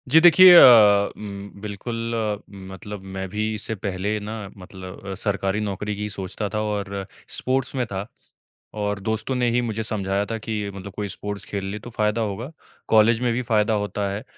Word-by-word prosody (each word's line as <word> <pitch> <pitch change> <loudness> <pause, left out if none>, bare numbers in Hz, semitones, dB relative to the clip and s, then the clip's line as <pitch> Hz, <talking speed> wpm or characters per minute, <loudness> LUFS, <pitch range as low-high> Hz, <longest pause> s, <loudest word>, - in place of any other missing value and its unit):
जी, 155 +5 +7
देखिए 175 +2 +9
अ, 105 -8 +8
उम, 100 -1 -8
बिल्कुल 115 +3 -4 0.4
मतलब 95 +1 -9
मैं 95 0 -3
भी 110 +3 -2
इससे 110 +1 -4
पहले 100 +1 -2
ना 105 +1 -6 0.2
मतलब 95 +1 -9
सरकारी 100 0 0
नौकरी 105 0 -3
की 105 +1 -4
सोचता 100 +1 -4
था 105 - 0
और 100 -2 -3 0.3
स्पोर्ट्स 130 +1 -1
में 125 -2 0
था। 100 0 -5 0.7
और 105 -1 -2
दोस्तों 110 +5 -2
ने 125 -1 +1
ही 120 +1 +2
मुझे 110 -2 -3
समझाया 100 -2 -1
था 115 - -1
कि 105 -2 -4
मतलब 100 0 -8
कोई 105 0 -4
स्पोर्ट्स 100 +1 -6
खेल 100 -1 -4
ले 105 - -4
तो 120 - -10
फ़ायदा 110 0 0
होगा, 110 +6 -4 0.4
कॉलेज 110 +1 +5
में 125 -1 +1
भी 125 - -1
फ़ायदा 110 -2 +1
होता 105 -1 -1
है 100 +2 -5
105 Hz, 180 wpm, -23 LUFS, 100-115 Hz, 0.7 s, देखिए